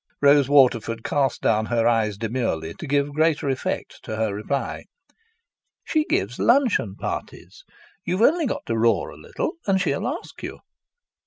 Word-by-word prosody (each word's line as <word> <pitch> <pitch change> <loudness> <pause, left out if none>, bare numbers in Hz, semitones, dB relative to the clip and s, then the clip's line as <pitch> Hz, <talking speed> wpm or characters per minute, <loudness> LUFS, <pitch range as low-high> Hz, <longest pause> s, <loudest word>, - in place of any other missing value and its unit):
Rose 140 -1 +5
Waterford 120 -5 +3
cast 140 -2 0
down 110 0 +2
her 115 -1 +1
eyes 110 -3 +1
demurely 110 -8 -2
to 155 - -8
give 140 +1 0
greater 155 -1 +1
effect 130 -2 -3
to 110 - -5
her 110 -2 -1
reply. 120 +7 -3 1.0
"She 310 -1 +1
gives 105 - -1
luncheon 235 - +2
parties. - - -6 0.4
You've 185 +5 0
only 325 +3 +4
got - - -4
to 115 - -1
roar 115 0 +2
a - - -12
little, - - -4
and 195 -1 +3
she'll 185 +6 -1
ask 305 +7 -6
you." - - -6
130 Hz, 155 wpm, -23 LUFS, 115-160 Hz, 1.0 s, Rose